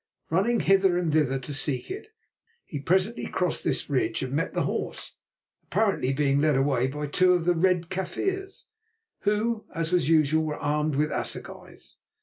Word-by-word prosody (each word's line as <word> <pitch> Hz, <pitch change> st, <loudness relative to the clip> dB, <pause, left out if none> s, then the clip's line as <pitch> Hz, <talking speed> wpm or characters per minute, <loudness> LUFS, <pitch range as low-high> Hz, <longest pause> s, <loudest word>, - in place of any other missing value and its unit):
Running 205 Hz, +8 st, +2 dB
hither 195 Hz, -2 st, +3 dB
and 170 Hz, -4 st, 0 dB
thither 145 Hz, -4 st, +2 dB
to 135 Hz, +2 st, -6 dB
seek 140 Hz, -, 0 dB
it, 405 Hz, +3 st, -6 dB, 0.6 s
he 145 Hz, -, -6 dB
presently 190 Hz, -, 0 dB
crossed 180 Hz, -3 st, -1 dB
this -, -, -1 dB
ridge 135 Hz, -2 st, 0 dB
and 130 Hz, 0 st, -4 dB
met 165 Hz, +5 st, -1 dB
the -, -, +1 dB
horse, -, -, -4 dB, 0.5 s
apparently 200 Hz, -12 st, 0 dB
being 140 Hz, 0 st, +1 dB
led 150 Hz, -2 st, +3 dB
away 135 Hz, -2 st, +2 dB
by 150 Hz, +2 st, -4 dB
two 180 Hz, +5 st, +3 dB
of 175 Hz, -2 st, 0 dB
the 175 Hz, -, +4 dB
Red 175 Hz, 0 st, +1 dB
Kaffirs, 385 Hz, -, -3 dB, 0.6 s
who, 215 Hz, +2 st, 0 dB
as 165 Hz, 0 st, -1 dB
was 175 Hz, -5 st, +2 dB
usual, 155 Hz, -1 st, +3 dB
were 150 Hz, -1 st, -3 dB
armed 150 Hz, 0 st, -1 dB
with 150 Hz, +2 st, +1 dB
assegais. -, -, -4 dB
160 Hz, 165 wpm, -26 LUFS, 145-190 Hz, 0.6 s, the